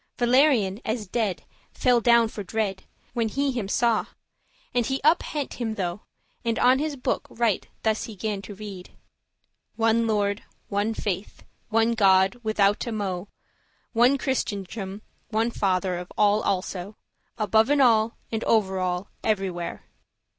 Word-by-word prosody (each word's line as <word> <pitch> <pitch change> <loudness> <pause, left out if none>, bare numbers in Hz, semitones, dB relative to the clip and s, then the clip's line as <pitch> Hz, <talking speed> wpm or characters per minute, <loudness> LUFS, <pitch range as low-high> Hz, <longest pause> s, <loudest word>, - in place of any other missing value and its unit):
Valerian, 240 -5 +3
as 220 -2 -2
dead, 205 -1 -2 0.3
fell 245 -2 +3
down 235 0 +5
for 220 - -7
dread, 200 -1 -2 0.3
When 230 -2 0
he 275 +5 0
him 235 -6 -3
saw; 230 +2 +1 0.7
and 245 - +2
he 265 +3 -1
up 315 +3 +5
hent* 290 -4 -5
him 225 -2 -1
tho, 175 -3 -2
*took - - -31 0.4
there 235 - -1
And 230 - 0
on 255 +2 +4
his 300 0 -2
book 255 - -2
right 225 -4 0 0.2
thus 220 -1 +1
he 220 - -9
gan 205 0 -3
to 200 +1 -9
read; 195 -3 -9 0.8
"One 225 0 +2
Lord, 205 -1 0 0.3
one 205 +2 0
faith, 200 -1 -4 0.3
one 225 +1 +3
God 195 0 +4
withoute 215 +1 +1
mo', 195 -3 -3 0.7
One 245 +4 +5
Christendom, 205 -6 -3 0.3
one 225 +1 +1
Father 185 -4 0
of 180 - -9
all 210 +1 +4
also, 190 +1 -2 0.4
Aboven 220 +6 +3
all, 230 -3 +4
and 225 -1 -2
over 190 -4 +2
all 180 +1 -2
everywhere." 190 -5 -2
220 Hz, 145 wpm, -25 LUFS, 195-235 Hz, 0.8 s, down